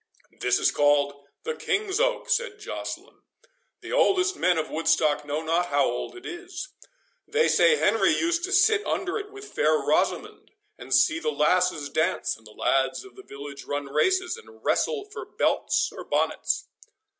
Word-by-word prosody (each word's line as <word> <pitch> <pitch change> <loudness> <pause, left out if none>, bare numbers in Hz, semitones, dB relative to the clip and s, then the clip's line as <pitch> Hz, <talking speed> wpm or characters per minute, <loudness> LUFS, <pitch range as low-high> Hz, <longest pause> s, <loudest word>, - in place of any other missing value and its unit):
"That - - -14
is - - +2
called 140 -1 +1 0.2
the 470 - -2
King's 415 -2 -1
Oak," - - 0
said 485 -5 0
Joceline; 430 - -7 0.6
"the - - -8
oldest 385 -6 +3
men 180 - +2
of 155 - -2
Woodstock 155 -2 +1
know 150 +2 -3
not 165 +2 +1
how 145 -3 +2
old 120 - -3
it 370 +2 -12
is; 360 +1 -7 0.6
they 470 +1 +2
say 475 -1 +5
Henry - - +3
used 340 +1 0
to 385 - -7
sit 420 +2 +4
under 375 +3 -1
it 415 0 -8
with 410 0 -11
fair 155 +1 +3
Rosamond, - - -1 0.3
and 125 +2 -11
see 130 +5 +4
the 155 -1 -1
lasses 150 +1 +1
dance, 160 +5 0
and 110 -1 -17
the - - -14
lads 135 - 0
of 390 - -15
the 390 - -11
village 140 - -10
run 145 0 -3
races, 375 +2 +1
and 445 -1 -16
wrestle 430 -4 +1
for 415 - -8
belts - - 0
or - - -8
bonnets." - - -1
335 Hz, 170 wpm, -26 LUFS, -, 0.6 s, say